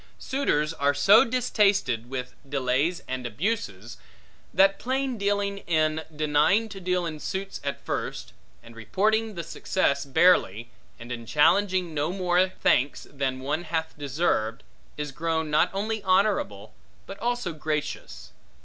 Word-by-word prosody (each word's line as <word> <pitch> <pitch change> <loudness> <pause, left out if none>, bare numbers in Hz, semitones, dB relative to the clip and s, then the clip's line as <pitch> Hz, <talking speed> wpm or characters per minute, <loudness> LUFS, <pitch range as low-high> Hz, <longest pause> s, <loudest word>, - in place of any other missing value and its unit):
Suitors 165 - 0
are 145 -2 +1
so 195 +10 +7
distasted 205 - +1
with 130 -1 -5 0.2
delays 140 +6 0
and 130 -1 -3
abuses, 120 - -3 0.5
that 195 +1 +4
plain 265 0 -1
dealing, 200 -1 -1
in 155 -1 +1
denying 155 +9 +2
to 200 -2 -8
deal 180 -1 0
in 155 -2 -5
suits 195 +5 -5
at 140 0 -3
first, - - -4 0.3
and 115 0 -14
reporting 215 - 0
the 170 - -4
success 145 -3 0
barely, 135 - +3 0.3
and 120 +1 -9
in 115 -2 -6
challenging 185 - +3
no 150 +2 -1
more 185 0 +2
thanks 140 -6 +1
than 135 -2 -2
one 150 +6 -2
hath 160 -1 -3
deserved, 135 -5 -1 0.3
is 150 -1 -4
grown 160 +1 -2
not 150 - +4
only 215 +3 -2
honorable, 185 - +1 0.3
but - - -9
also 240 -7 -2
gracious. 150 - -4
160 Hz, 135 wpm, -26 LUFS, 140-195 Hz, 0.5 s, so